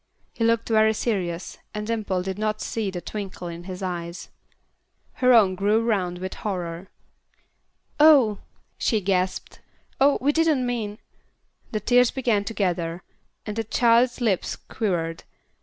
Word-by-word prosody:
He 230 Hz, -, -3 dB
looked 230 Hz, 0 st, +2 dB
very 220 Hz, -1 st, +3 dB
serious, 185 Hz, -7 st, -3 dB, 0.2 s
and 210 Hz, 0 st, -3 dB
Dimple 210 Hz, -5 st, -1 dB
did 190 Hz, +2 st, -4 dB
not 215 Hz, 0 st, -1 dB
see 220 Hz, -2 st, -2 dB
the 180 Hz, -2 st, -5 dB
twinkle 195 Hz, -4 st, -6 dB
in 170 Hz, 0 st, -8 dB
his 185 Hz, 0 st, -6 dB
eyes. 170 Hz, -1 st, -5 dB, 0.8 s
Her 255 Hz, 0 st, +3 dB
own 215 Hz, -6 st, +6 dB
grew 205 Hz, +4 st, +2 dB
round 195 Hz, -6 st, 0 dB
with 185 Hz, +1 st, -5 dB
horror. 180 Hz, -2 st, -4 dB, 1.1 s
"Oh!" 275 Hz, -9 st, +6 dB, 0.4 s
she 220 Hz, -, +1 dB
gasped. 185 Hz, -1 st, -1 dB, 0.4 s
"Oh! 275 Hz, +1 st, +5 dB
we 280 Hz, +3 st, +2 dB
didn't 310 Hz, -5 st, +2 dB
mean 220 Hz, -4 st, -3 dB, 0.4 s
" -, -, -41 dB
The 215 Hz, -, -1 dB
tears 245 Hz, +3 st, +4 dB
began 235 Hz, -6 st, 0 dB
to 225 Hz, -, -4 dB
gather, 175 Hz, -3 st, -1 dB, 0.4 s
and 210 Hz, -, -4 dB
the 225 Hz, -, -1 dB
child's 235 Hz, +3 st, +3 dB
lips 210 Hz, -6 st, 0 dB
quivered. 170 Hz, -7 st, -3 dB
210 Hz, 145 wpm, -24 LUFS, 185-230 Hz, 1.1 s, own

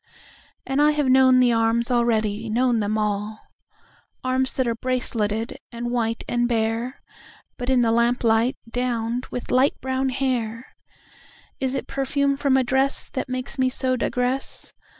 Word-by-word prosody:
And 270 Hz, +2 st, 0 dB
I 300 Hz, 0 st, +5 dB
have 295 Hz, -1 st, 0 dB
known 260 Hz, 0 st, +6 dB
the 245 Hz, -1 st, +4 dB
arms 230 Hz, +2 st, +1 dB
already, 225 Hz, -2 st, +1 dB
known 240 Hz, +1 st, +2 dB
them 210 Hz, +1 st, 0 dB
all—Arms 215 Hz, +5 st, -4 dB
that 260 Hz, -2 st, 0 dB
are 230 Hz, -, +1 dB
braceleted 230 Hz, -3 st, -1 dB
and 240 Hz, 0 st, -4 dB
white 230 Hz, -2 st, -1 dB
and 240 Hz, 0 st, 0 dB
bare(But 235 Hz, +2 st, -4 dB
in 260 Hz, -2 st, +4 dB
the 230 Hz, -1 st, +2 dB
lamplight, 235 Hz, +1 st, +2 dB
downed 240 Hz, 0 st, -2 dB
with 245 Hz, -, -6 dB
light 260 Hz, +3 st, +3 dB
brown 265 Hz, 0 st, -1 dB
hair!)Is 255 Hz, +1 st, -5 dB
it -, -, -3 dB
perfume 275 Hz, +1 st, 0 dB
from 275 Hz, -1 st, +2 dB
a 260 Hz, -, +3 dB
dressThat 265 Hz, 0 st, -1 dB
makes 255 Hz, +1 st, -4 dB
me 260 Hz, 0 st, +3 dB
so 255 Hz, 0 st, -1 dB
digress? 250 Hz, +2 st, -2 dB
245 Hz, 135 wpm, -23 LUFS, 230-260 Hz, -, known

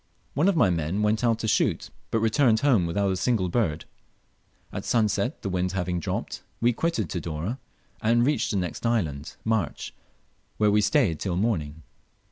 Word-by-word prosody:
One 150 Hz, +7 st, +2 dB
of 200 Hz, -, +3 dB
my 100 Hz, -, +4 dB
men 85 Hz, +5 st, -1 dB
went 110 Hz, +2 st, +1 dB
out 115 Hz, -2 st, +3 dB
to 110 Hz, -, -3 dB
shoot, -, -, +1 dB, 0.2 s
but 115 Hz, -, 0 dB
returned 115 Hz, 0 st, +3 dB
home 120 Hz, -12 st, +3 dB
without 100 Hz, +3 st, 0 dB
a -, -, 0 dB
single 95 Hz, -1 st, +1 dB
bird. 85 Hz, -7 st, 0 dB, 0.9 s
At -, -, -4 dB
sunset, 115 Hz, +4 st, 0 dB
the 100 Hz, -, -2 dB
wind 90 Hz, 0 st, -1 dB
having 90 Hz, -1 st, -1 dB
dropped, -, -, -4 dB, 0.2 s
we 120 Hz, +1 st, +3 dB
quitted 115 Hz, -, -1 dB
Tidore, 85 Hz, -, -4 dB, 0.4 s
and 120 Hz, +2 st, +3 dB
reached 150 Hz, +2 st, +1 dB
the 100 Hz, -, 0 dB
next 90 Hz, -4 st, -3 dB
island, 80 Hz, -12 st, -1 dB
March, 110 Hz, -9 st, -1 dB, 0.6 s
where 105 Hz, -1 st, +3 dB
we 105 Hz, +1 st, +4 dB
stayed 105 Hz, -, +2 dB
till 95 Hz, -3 st, -2 dB
morning. 80 Hz, -8 st, -1 dB
105 Hz, 170 wpm, -26 LUFS, 90-115 Hz, 0.9 s, my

